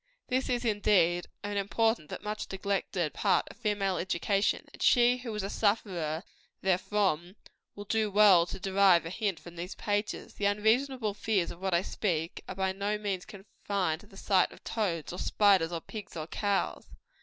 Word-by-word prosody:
This 260 +1 0
is, 245 -1 0
indeed, 195 -5 +2 0.2
an 205 0 -3
important 225 -3 +1
but - - -7
much 210 +1 -4
neglected 190 -5 -1
part - - +2
of - - -17
female 205 -5 0
education; 195 +3 0
and - - -13
she 245 0 +5
who 250 -2 -6
is 210 - -2
a 195 - -3
sufferer 185 -7 0 0.4
therefrom, 185 -2 0 0.4
will 205 - -8
do 220 +1 +1
well 195 -4 +6
to 190 - -6
derive 190 -2 +4
a 165 - -5
hint 200 -3 -2
from 175 -1 -12
these 175 +3 -5
pages. 205 0 -2
The 205 - -3
unreasonable 220 +3 +1
fears 205 -3 0
of 170 - -11
which 190 -1 -1
I 170 +2 +3
speak, 170 -6 -2
are 185 - -5
by 190 0 0
no 200 +2 -2
means 200 -3 -3
confined 195 -4 -3
to - - -17
the 195 - -16
sight 190 -2 +2
of - - -15
toads, 175 -8 -2
or 180 - -6
spiders, 195 -5 +3
or 165 -1 -3
pigs, 210 -3 -8
or 155 - -3
cows. 200 +4 -1
200 Hz, 180 wpm, -30 LUFS, 180-210 Hz, 0.4 s, well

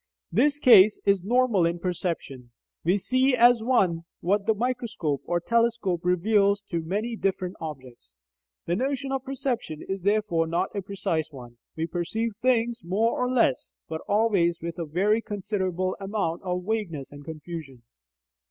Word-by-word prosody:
This 290 0 +3
case 215 -7 +7
is 200 -3 +3
normal 235 -3 +2
in 170 +1 +1
perception: 170 -8 -4 0.3
we 180 +4 +3
see 255 +5 +2
as 240 -1 +5
one 190 -9 +1
what 200 +4 0
the 220 - +3
microscope 230 - -2
or 175 0 0
telescope 230 -3 +1
reveals 200 +3 +2
to 170 - 0
be 160 - -11
many 215 +6 -2
different 190 -3 -2
objects. 130 - -9 0.5
The 170 - 0
notion 270 +4 -2
of 270 -1 -2
perception 255 - -3
is 195 0 -3
therefore 195 -4 +1
not 175 +5 -1
a 200 - -1
precise 170 -5 -2
one: 120 -4 -12 0.2
we 160 - -1
perceive 180 +7 -2
things 240 -1 +1
more 210 +7 +1
or 250 - -1
less, 235 - +1 0.2
but 160 0 -5
always 200 -5 +2
with 170 +1 -6
a 170 - -2
very 200 +8 +1
considerable 185 -3 -2
amount 195 -4 -2
of 180 -1 -3
vagueness 190 -11 -3
and 145 0 -11
confusion. 155 -4 -8
190 Hz, 155 wpm, -26 LUFS, 170-225 Hz, 0.5 s, case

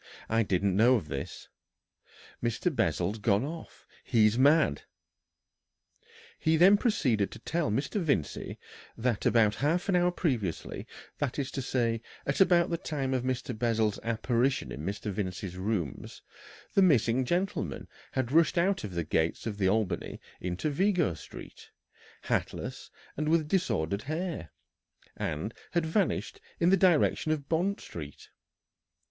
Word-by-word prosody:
"I 115 +1 +3
didn't 100 -2 +1
know 120 +5 +5
of 85 -11 -3
this. 70 0 -6 0.9
Mr. 120 +8 -1
Bessel's 90 +5 0
gone 105 +2 +2
off. 165 +2 -9 0.2
He's 110 -3 +3
mad!" 140 - +4 1.6
He 160 0 +2
then 185 +5 +7
proceeded 130 - +1
to - - -10
tell 170 -2 -1
Mr. 135 - -1
Vincey 140 - -1 0.4
that 115 -2 0
about 110 -3 +4
half 165 - 0
an 190 - +3
hour 180 0 +4
previously, 125 - -2 0.3
that 140 -4 -2
is 140 -1 -2
to 135 - -3
say, 115 -3 0 0.2
at 140 +7 0
about 175 -2 +4
the 170 - -1
time 135 -4 -2
of 130 - +1
Mr. 125 -1 -2
Bessel's 110 -2 +1
apparition 120 +3 0
in - - -6
Mr. 100 +3 -3
Vincey's 95 -1 -4
rooms, 95 - -3 0.5
the 195 - +4
missing 130 - +4
gentleman 175 - -2 0.3
had 130 -2 -1
rushed 165 +3 +4
out 190 +3 +2
of 100 -4 -6
the 85 - 0
gates 80 +1 0
of 105 -3 -4
the 95 -2 +3
Albany 105 -1 -1 0.2
into 90 - -2
Vigo 180 - +2
Street, 75 - -11 0.5
hatless - - -3 0.3
and 150 +1 -1
with 160 -2 +2
disordered 100 - 0
hair, 160 - -4 0.7
and 80 +10 -3 0.2
had 170 -1 +1
vanished 180 +4 -1 0.2
into 175 +3 +5
the - - -3
direction 160 -2 +2
of 145 -3 -2
Bond 180 +5 0
Street. 75 -4 -9
125 Hz, 140 wpm, -29 LUFS, 100-160 Hz, 1.6 s, then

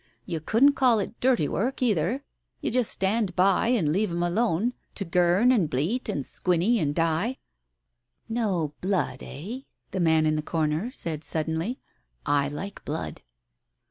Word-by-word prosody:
You 165 -3 -3
couldn't 235 - +4
call 255 -4 +4
it 210 +3 -4
dirty 245 - +2
work 255 +6 -1
either. 215 - +1 0.4
You - - -2
just 245 -1 +2
stand 195 -1 0
by 190 +3 +3
and 215 -12 +2
leave 205 +5 +1
'em 170 0 -1
alone 215 +4 +1
— - - -43
to 195 - -4
girn 180 +7 +3
and 195 -12 +2
bleat 170 - -1
and 140 - -2
squinny 180 +6 +1
and 145 -3 0
die." 165 +10 0 0.9
"No 200 -10 -1
blood, 185 -8 -1
eh? 200 - -7 0.2
" - - -48
the 190 - -3
man 160 -2 +4
in 155 0 +2
the - - 0
corner 155 +6 -1
said 160 - -4
suddenly. 160 - 0 0.5
"I 145 -1 +2
like 185 +8 -6
blood." 155 +2 -4
180 Hz, 165 wpm, -26 LUFS, 160-230 Hz, 0.9 s, couldn't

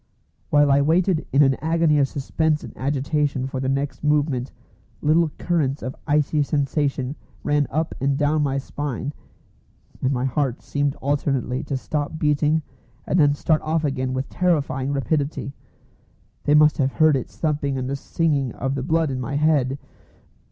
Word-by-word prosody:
While 145 -1 +4
I 140 +1 +5
waited 170 +3 +2
in 140 +2 +5
an 135 -1 +4
agony 160 -2 +2
of 140 - +3
suspense 150 +3 -1
and - - -10
agitation 140 0 -1
for 135 0 -4
their 130 0 -1
next 140 +2 -2
movement 145 -4 +1 0.5
little 160 +2 +3
currents 150 -5 0
of 130 - -4
icy 150 0 +2
sensation 140 -1 -1 0.3
ran 145 -1 +1
up 160 +3 -1
and 135 0 +1
down 150 +1 +2
my 140 -2 0
spine 140 0 -4 0.9
and 130 - +1
my 130 -1 0
heart 135 -1 -1
seemed 145 -1 -1
alternately 135 -2 0
to 140 -1 -2
stop 145 +3 -3
beating 150 +1 +2 0.4
and 180 - +1
then 145 -2 +4
start 155 +1 +1
off 160 0 -1
again 130 -2 -1
with 130 +1 -2
terrifying 145 -6 0
rapidity. 140 0 -1 0.9
They 145 - +4
must 150 0 +5
have 135 -1 +1
heard 155 -2 +4
its 130 - -5
thumping 145 -3 -1
and 130 -1 -3
the 140 - -2
singing 140 -4 -1
of 135 0 -2
the 135 - -2
blood 160 +1 +1
in 130 - -3
my 125 +3 -3
head! 145 -3 +2
145 Hz, 165 wpm, -23 LUFS, 135-150 Hz, 0.9 s, I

